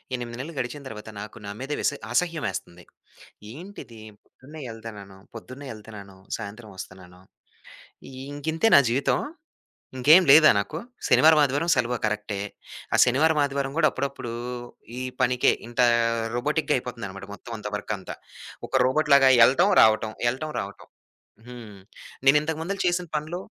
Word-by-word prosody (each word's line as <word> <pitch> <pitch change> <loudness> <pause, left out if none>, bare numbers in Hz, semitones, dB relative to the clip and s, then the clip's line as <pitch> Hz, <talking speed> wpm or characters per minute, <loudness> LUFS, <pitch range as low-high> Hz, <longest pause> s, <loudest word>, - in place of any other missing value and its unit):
8 120 -1 -6
నెలలు 155 +6 -6
గడిచిన 140 +4 -4
తరువాత 110 -1 -9
నాకు 105 +2 -9
నా 100 - -5
మీద 135 +3 -6
విస - - +1 0.2
అసహ్యమేస్తంది. 120 - -2 0.7
ఏంటిది? 150 - -11 0.2
పొద్దున్నే 150 +4 -14
ఎళ్తన్నాను, 105 -4 -10 0.2
పొద్దున్నే 130 +5 -10
ఎళ్తన్నాను, 105 -3 -12 0.2
సాయంత్రం 110 0 -9
వస్తన్నాను. 90 -1 -11 1.1
ఇంకింతేనా 160 +5 +3
జీవితం? 130 +4 +1 0.8
ఇంకేం 155 +9 +7
లేదా 155 +2 +9
నాకు? 125 +10 -3 0.3
శనివారం, 155 0 +6
ఆదివారం 145 +5 -1
సెలవు. 120 +1 0
కరెక్టే. 105 -1 -3 0.5
ఆ - - +5
శనివారం, 150 +5 +2
ఆదివారం 140 -1 -2
కూడా 155 -2 +5
అప్పుడప్పుడు 135 -3 -5 0.7
ఈ - - -3 0.2
పనికే, 125 0 +3 0.2
ఇంత 120 +1 -3 0.5
రోబోటిక్‌గా 150 +4 0
అయిపోతుందన్నమాట. 115 -6 -8
మొత్తం 120 - -11
అంతా 105 - -6
వర్కంతా 105 -2 -6 0.5
ఒక - - -15
రోబోట్ 150 +4 +1
లాగా 135 -1 +6
ఎళ్లటం, 135 +11 +4
రావటం, 110 0 +3
వెళ్లటం, 135 +6 -2
రావటం. 100 +1 -9 0.6
హ్మ్. 115 -5 -11 0.5
నేనింతకుముందు 160 +6 +2
చేసిన 175 0 0
పనులు 155 +4 -3
125 Hz, 125 wpm, -25 LUFS, 110-150 Hz, 1.1 s, లేదా